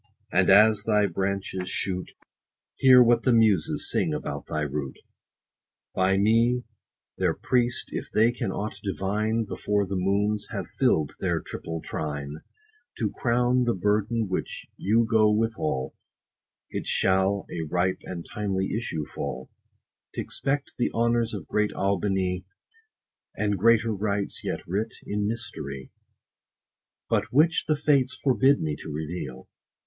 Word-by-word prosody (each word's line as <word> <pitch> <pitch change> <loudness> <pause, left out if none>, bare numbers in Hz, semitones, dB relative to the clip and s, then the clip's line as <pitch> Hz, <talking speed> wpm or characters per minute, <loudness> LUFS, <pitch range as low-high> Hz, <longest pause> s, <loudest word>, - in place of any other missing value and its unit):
and 95 0 +3
as 105 +1 +6
thy 105 -2 +3
branches 95 0 -2
shoot, 90 -2 -2
90 - - -51 0.6
Hear 130 -1 +8
what 120 0 +4
the 130 - +2
Muses 110 -8 +3
sing - - +1
about - - -5
thy 75 - -2
root, 75 -2 -3 1.0
By 95 +1 +2
me, 115 +4 +3 0.6
their - - +1
priest, 125 -1 0
if - - -5
they 115 +2 +4
can 120 -5 -3
aught 105 +3 -4
divine: 105 +4 -1
Before 105 0 -1
the 95 +1 -4
moons 100 +3 0
have - - -4
fill'd 75 -2 +1
their - - 0
triple 80 -1 -6
trine, 75 -1 -4 0.6
To 110 -3 -1
crown 125 +1 +1
the 120 - +1
burden 105 +3 0
which 95 - -4
you 115 +4 +2
go 110 -2 +4
withal, 105 -12 -1 0.8
It - - -4
shall 95 +1 +2
a 85 - -3
ripe 90 +2 0
and 85 -2 -6
timely 95 -2 -2
issue 80 -10 -3
fall, 65 -2 -6 0.6
T' - - -1
expect 140 +1 -3
the 120 - +2
honors 115 -1 +1
of 100 - -7
great 105 0 0
AUBIGNY; 95 -1 0 0.9
And 105 -1 0
greater 115 +3 +3
rites, 100 0 -2
yet - - -3
writ 105 +5 -2
in 105 0 -1
mystery, 75 - -5 1.2
But - - 0
which 155 +5 +3
the 155 - +3
fates 140 -3 +2
forbid 135 +1 +3
me 75 -1 -1
to 80 - -8
reveal. 80 +4 -5
105 Hz, 140 wpm, -26 LUFS, 95-115 Hz, 1.2 s, Hear